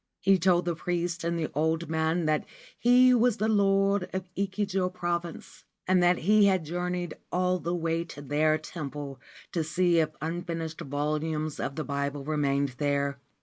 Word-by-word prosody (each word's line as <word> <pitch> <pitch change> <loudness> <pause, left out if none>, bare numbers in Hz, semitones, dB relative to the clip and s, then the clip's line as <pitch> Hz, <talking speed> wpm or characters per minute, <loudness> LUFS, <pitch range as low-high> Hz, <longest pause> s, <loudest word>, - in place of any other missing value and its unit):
He 195 0 +4
told 180 0 +3
the 175 - 0
priests 175 0 -2
and 170 0 -1
the 160 -2 -2
old 160 +3 0
man 160 +1 0
that 155 -1 +1 0.3
he 250 +1 +6
was 240 -1 +3
the 215 - 0
Lord 195 -2 +2
of 190 0 -3
Echigo 195 -1 -1
Province, 175 -2 -4 0.2
and 185 -1 +4
that 175 0 +4
he 210 +4 +4
had 190 -4 +2
journeyed 175 +1 -3 0.2
all 180 0 +1
the 170 +1 -2
way 165 0 -1
to 145 - -10
their 155 +2 +2
temple 145 -4 -7 0.3
to 165 - 0
see 170 +2 +2
if 155 -1 +2
unfinished 165 0 -4
volumes 150 +2 -2
of 135 - -3
the 155 - -3
Bible 140 0 -3
remained 140 -2 0
there. 140 -1 0
170 Hz, 165 wpm, -28 LUFS, 155-185 Hz, 0.3 s, he